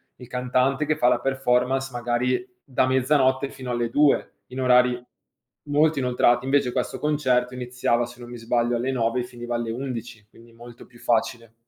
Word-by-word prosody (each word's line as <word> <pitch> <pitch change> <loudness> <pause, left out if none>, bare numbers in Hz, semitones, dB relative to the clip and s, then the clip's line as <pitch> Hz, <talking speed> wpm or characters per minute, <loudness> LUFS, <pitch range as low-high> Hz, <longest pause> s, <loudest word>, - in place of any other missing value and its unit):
il 125 - -13
cantante 125 +3 0
che 155 +1 +1
fa 125 -5 +3
la 120 - +2
performance, 135 0 0
magari, 120 +1 -1 0.2
da 130 -1 0
mezzanotte 130 +1 +2
fino 130 -1 -8
alle 120 -1 -1
2:00, 145 +2 +2 0.2
in 130 +1 -6
orari 125 -1 +4 0.6
molto 150 +1 +2
inoltrati. 125 -1 +2
Invece 135 -2 +2
questo 125 - -2
concerto 130 -5 +1
iniziava, 125 -1 -1
se 120 +1 -13
non 120 -1 -10
mi 120 - -8
sbaglio, 120 +1 0
alle 125 +3 -1
9:00 120 -1 0
e - - -4
finiva 120 -1 -6
alle 120 -1 -2
11:00, 120 -3 -6
quindi 115 +1 -18
molto 120 0 -13
più 120 -1 -19
facile. 115 0 -1
125 Hz, 175 wpm, -24 LUFS, 120-130 Hz, 0.6 s, orari